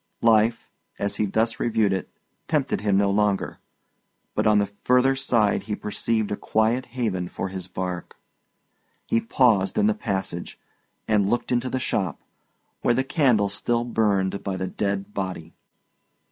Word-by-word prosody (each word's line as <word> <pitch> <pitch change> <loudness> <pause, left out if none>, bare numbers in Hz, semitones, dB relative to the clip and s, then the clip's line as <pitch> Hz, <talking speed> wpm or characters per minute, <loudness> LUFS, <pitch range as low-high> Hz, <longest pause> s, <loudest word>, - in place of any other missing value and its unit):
Life, 115 0 +3 0.3
as 100 0 -2
he 105 - +1
thus 115 +3 0
reviewed 110 -4 +2
it, 95 - -3 0.4
tempted - - 0
him 100 -2 +2
no 100 0 +3
longer; 105 -1 0 0.7
but - - +1
on 105 -1 +5
the 100 - +3
further 125 +6 +2
side 115 -6 +2
he 105 - 0
perceived 110 +1 -1
a - - 0
quiet 115 +5 0
haven 95 -7 -1
for 95 - -4
his 95 -1 -6
bark. 90 -1 -5 0.9
He 115 - +1
paused 115 -5 +2
in 210 - +4
the 215 - +4
passage, 95 - -4 0.5
and 105 -2 +2
looked 120 +2 -1
into 125 +1 +1
the 130 - -1
shop, 95 - -1 0.6
where 120 - +2
the 130 - +1
candle 130 - +2
still 115 +4 0
burned 100 -5 0
by 95 -2 -2
the 95 - -2
dead 100 +1 -3
body. 95 -4 -4
105 Hz, 155 wpm, -24 LUFS, 95-120 Hz, 0.9 s, on